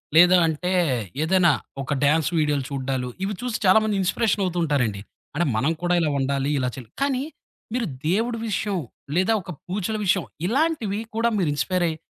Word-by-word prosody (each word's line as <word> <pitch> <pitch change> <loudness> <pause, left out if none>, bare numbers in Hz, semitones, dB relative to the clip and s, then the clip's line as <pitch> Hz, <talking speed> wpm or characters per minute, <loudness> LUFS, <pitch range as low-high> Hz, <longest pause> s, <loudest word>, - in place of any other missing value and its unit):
లేదా 180 +2 +8
అంటే, 165 +3 -2 0.5
ఏదైనా 175 0 +4 0.3
ఒక 135 - -5
డ్యాన్స్ 155 +2 +3
వీడియోలు 150 -3 +1
చూడ్డాలు, 130 -2 -2 0.2
ఇవి 200 +2 -1
చూసి 245 -2 -2
చాలా 185 +3 +7
మంది 215 -1 0
ఇన్‌స్పిరేషన్ 205 +3 +1
అవుతూ 180 -1 -2
ఉంటారండి. 125 -10 0 0.3
అంటే, 170 +3 +1
మనం 135 +8 +2
కూడా 175 0 +2
ఇలా 160 - +1
ఉండాలి. 135 +1 0
ఇలా 125 -1 0
చెలో 125 -5 -10
కానీ, 270 -2 0 0.5
మీరు 245 -1 0 0.2
దేవుడి 230 +5 0
విషయం 205 -1 -1 0.4
లేదా 185 +5 +3
ఒక 180 -1 -8 0.2
పూజల 200 +3 -2
విషయం 185 -1 +2 0.2
ఇలాంటివి 245 - 0 0.2
కూడా 230 +1 +2
మీరు 175 -6 +1
ఇన్‍స్పైర్ 180 +5 0
అయ్యి 160 - -5
180 Hz, 170 wpm, -24 LUFS, 145-210 Hz, 0.5 s, లేదా